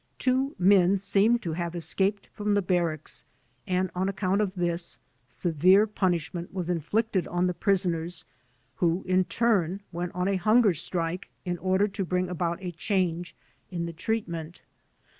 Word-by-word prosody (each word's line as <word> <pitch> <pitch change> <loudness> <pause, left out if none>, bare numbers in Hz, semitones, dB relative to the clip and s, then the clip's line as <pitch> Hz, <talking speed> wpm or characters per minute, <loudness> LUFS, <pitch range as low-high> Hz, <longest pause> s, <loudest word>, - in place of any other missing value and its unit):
Two 265 +2 +1
men 190 0 +5
seemed 200 +4 +2
to 165 - -2
have 170 +1 -3
escaped 195 +4 0
from 210 0 0
the 205 - +2
Barracks 170 -4 -1 0.4
and 185 0 0
on 185 +2 0
account 195 +1 0
of 200 -2 -1
this, 170 -1 -2 0.3
severe 175 +9 +4
punish 185 -7 -1
ment 175 -1 -5
was 180 -2 -2
inflicted 190 +4 0
on 175 +1 0
the 180 - +1
prisoners 175 -4 -1 0.5
who 175 +1 +1
in 185 0 +3
turn 195 -1 +1
went 175 +1 -3
on 180 +1 0
a 195 -1 +1
hunger 215 +1 +4
strike 170 +2 -3 0.2
in 175 -1 -2
order 190 +3 +2
to 195 0 -3
bring 180 0 -1
about 170 -1 -2
a 180 - -3
change 175 -1 -1 0.3
in 170 -3 -3
the 170 - -5
treatment. 170 -4 -3
180 Hz, 160 wpm, -27 LUFS, 170-200 Hz, 0.5 s, men